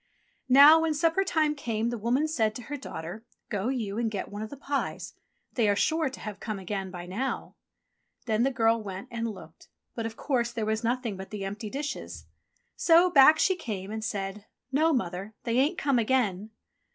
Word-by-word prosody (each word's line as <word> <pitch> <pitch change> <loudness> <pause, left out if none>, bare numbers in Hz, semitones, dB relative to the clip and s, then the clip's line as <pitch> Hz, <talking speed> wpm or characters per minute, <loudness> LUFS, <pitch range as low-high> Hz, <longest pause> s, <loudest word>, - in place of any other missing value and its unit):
Now 285 +5 +9
when 320 -1 0
supper 330 +5 +2
time 315 -5 +1
came 235 -5 -2
the 240 - -3
woman 250 +8 +1
said 220 -9 0
to 245 - -7
her 290 +6 -5
daughter, 215 - -7 0.3
"Go 205 0 -2
you 230 -5 -2
and 235 -1 0
get 205 -3 -4
one 205 +1 -6
of 215 - -5
the 285 - -9
pies. 280 0 -3 0.4
They 225 -4 +2
are 200 - +3
sure 315 +6 +1
to 260 - -10
have 210 -2 -6
come 215 -2 -4
again 195 0 -4
by 175 -1 -7
now." 220 +9 -3 0.7
Then 220 -2 +1
the 265 - +3
girl 230 -3 +2
went 195 -2 -7
and 230 -1 -2
looked, 210 - -12 0.3
but 230 -1 -3
of 225 - -9
course 240 -4 0
there 225 -2 -2
was 220 +1 -1
nothing 235 -3 -1
but 190 0 -8
the 205 -2 -5
empty 205 +2 -5
dishes. 290 +5 -5 0.5
So 345 +2 +5
back 305 +1 +8
she 375 - +3
came 205 - -5
and 220 0 -4
said, 205 -1 -4 0.2
"No, 310 +4 +3
Mother, 195 - -2
they 235 +1 +1
ain't 300 +7 +2
come 275 -3 +2
again." 220 -4 0
230 Hz, 200 wpm, -28 LUFS, 210-275 Hz, 0.7 s, Now